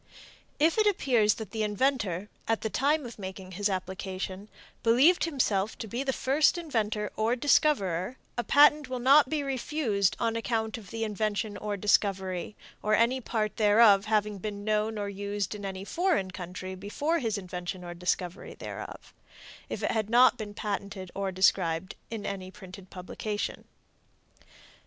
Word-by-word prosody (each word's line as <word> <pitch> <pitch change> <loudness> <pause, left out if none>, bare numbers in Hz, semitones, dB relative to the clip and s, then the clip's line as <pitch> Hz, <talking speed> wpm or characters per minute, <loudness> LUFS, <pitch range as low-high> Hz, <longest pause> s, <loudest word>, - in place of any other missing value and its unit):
If 320 +7 +3
it 425 - +4
appears 245 - +3
that 220 -4 -8
the 220 - -3
inventor, 210 -4 0 0.2
at 225 -1 +1
the 220 - -3
time 290 +2 +1
of 235 -2 -9
making 190 -1 -7
his 205 +3 -1
application, 190 +1 -4 0.3
believed 265 +11 +5
himself 220 -10 0
to - - -5
be 235 +5 -3
the 275 -1 0
first 280 +6 +2
inventor 220 -10 -2
or 220 +3 +1
discoverer, 240 - +2 0.2
a 240 - -1
patent 295 0 +5
will 255 - -2
not 270 +2 +5
be 300 -1 -1
refused 260 -7 0
on 230 0 0
account 225 -1 -2
of 200 -4 -14
the 225 0 -3
invention 215 0 -2
or 205 0 -3
discovery, 195 -1 +1 0.3
or 215 0 +2
any 235 +4 +2
part 215 -3 -2
thereof, 210 -1 +6
having 210 -2 0
been 205 +1 -5
known 215 +1 0
or 205 -1 -2
used 200 0 -3
in 205 -1 -8
any 190 0 -5
foreign 330 - 0
country 185 0 -6
before 285 - -1
his 225 -4 -1
invention 180 -1 -6
or 175 0 -6
discovery 180 +1 -3
thereof, - - -8 0.6
if - - -5
it - - +1
had 220 -2 -1
not 250 +2 +6
been 215 -3 -7
before - - -8
patented 195 -2 -5
or 195 -1 -2
described 185 -2 +2 0.2
in 225 -3 -5
any 190 -2 -4
printed 190 -1 -12
publication. 205 +3 -5
210 Hz, 160 wpm, -28 LUFS, 195-240 Hz, 0.6 s, thereof